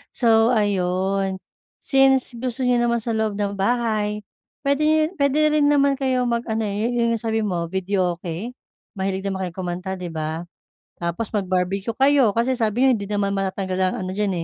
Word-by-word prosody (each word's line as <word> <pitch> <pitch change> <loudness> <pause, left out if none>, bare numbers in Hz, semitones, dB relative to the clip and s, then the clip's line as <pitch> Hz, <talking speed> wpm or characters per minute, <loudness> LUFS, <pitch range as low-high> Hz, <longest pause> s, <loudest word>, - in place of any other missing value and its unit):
So 230 0 +4
ayun, 195 -1 0 0.5
since 270 -1 +3
gusto 255 +1 -3
n'yo 250 -1 +3
naman 235 -1 +1
sa 235 - -2
loob 220 -2 -1
ng 200 -1 -3
bahay 215 -1 0 0.4
puwede 280 +2 +1
nyo 310 0 +4 0.2
puwede 280 0 +2 0.2
rin 290 -1 +4
naman 280 -1 +3
kayo 260 -2 +1
mag-ano 235 -2 -1
eh, 205 +1 -2
yo 235 -1 +1
'yong 230 - 0
sabi 220 0 -1
mo, 175 -4 -2
videoke? 185 +3 -2 0.4
Mahilig 190 -1 -2
din 195 - -2
naman 190 -1 -3
kayo - - -24
kumanta, 180 +1 -4
'di 180 - -5
ba? 160 +2 -3 0.5
Tapos 170 +6 -3
mag-barbecue 190 +2 -1
kayo 270 -4 +4
kasi 235 +4 +1
sabi 225 +1 0
nyo - - +6
hindi 200 -2 -5
naman 200 -1 0
matatanggal 190 -1 -2
ang - - -4
ano 185 - -4
diyan 205 -2 +1
210 Hz, 175 wpm, -22 LUFS, 190-240 Hz, 0.5 s, nyo